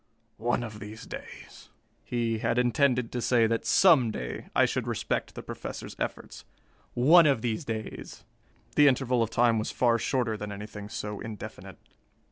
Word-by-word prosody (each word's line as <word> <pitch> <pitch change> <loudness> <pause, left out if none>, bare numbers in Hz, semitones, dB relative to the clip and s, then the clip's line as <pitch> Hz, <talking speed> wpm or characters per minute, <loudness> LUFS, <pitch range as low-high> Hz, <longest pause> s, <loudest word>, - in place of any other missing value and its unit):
One 120 +2 0
of 110 -2 -7
these 105 +1 -9
days...." - - -10 0.3
He 115 -2 -1
had 115 - 0
intended 125 0 +2
to 125 - -3
say 115 -1 +3
that 115 0 -1
some 155 -11 +5
day 65 - -5
I - - +5
should - - -2
respect - - -2
the - - -7
Professor's - - -7
efforts. - - -5 0.5
One 155 +7 +7
of 135 -6 +1
these 115 -3 -1
days! 110 -1 -6 0.5
The 145 -1 +6
interval 130 -2 +2
of 115 - +1
time 115 0 +3
was 110 - -2
far 120 -2 +2
shorter 120 -2 0
than 105 0 -6
anything 105 0 -8
so 105 -2 -5
indefinite. 110 -3 -8
115 Hz, 160 wpm, -28 LUFS, 110-125 Hz, 0.5 s, One